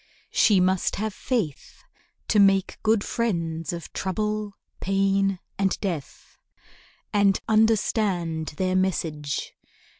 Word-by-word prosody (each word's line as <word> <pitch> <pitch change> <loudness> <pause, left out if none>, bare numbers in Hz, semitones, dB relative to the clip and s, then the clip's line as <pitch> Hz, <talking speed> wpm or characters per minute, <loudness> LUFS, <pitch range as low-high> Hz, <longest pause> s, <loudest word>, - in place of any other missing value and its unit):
She 205 -4 +4
must 185 0 +1
have 215 +1 -2
faith, 190 - -3 0.5
To 210 - +4
make 195 -1 +3
good 220 -1 +2
friends 165 -8 -2
of 170 -1 -7
Trouble, 210 +2 -2 0.3
Pain, 195 0 +1 0.2
and 195 -1 +1
Death, 175 -9 -6 0.7
And 200 -2 +3
understand 200 -8 +1
their 185 -1 0
message. 160 -6 -1
195 Hz, 100 wpm, -25 LUFS, 175-210 Hz, 0.7 s, She